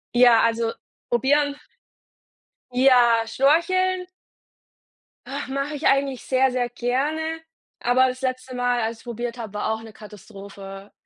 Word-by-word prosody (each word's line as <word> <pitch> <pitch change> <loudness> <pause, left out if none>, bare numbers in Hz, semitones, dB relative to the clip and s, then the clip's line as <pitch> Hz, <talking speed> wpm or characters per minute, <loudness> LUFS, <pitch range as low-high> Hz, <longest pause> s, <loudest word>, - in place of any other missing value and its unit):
Ja, 240 -2 +6
also 230 0 +1 0.4
probieren. 285 +4 +2 1.2
Ja, 245 -3 +4
Schnorcheln. 360 +8 +2 1.2
Ach, - - -5
mache 275 +2 -3
ich 290 - 0
eigentlich 275 -2 +1
sehr 265 0 +2
sehr 245 -1 0
gerne, 300 +7 -2 0.4
aber 255 +2 +3
das 255 +1 -7
letzte 255 0 -3
Mal, 245 -1 0
als 225 +1 -2
ich - - -19
es - - -18
probiert 240 0 -5
habe, 220 -4 -7
war 210 +1 -1
auch 220 - -5
'ne 220 -1 -12
Katastrophe. 200 -2 -11
245 Hz, 135 wpm, -23 LUFS, 230-275 Hz, 1.2 s, Ja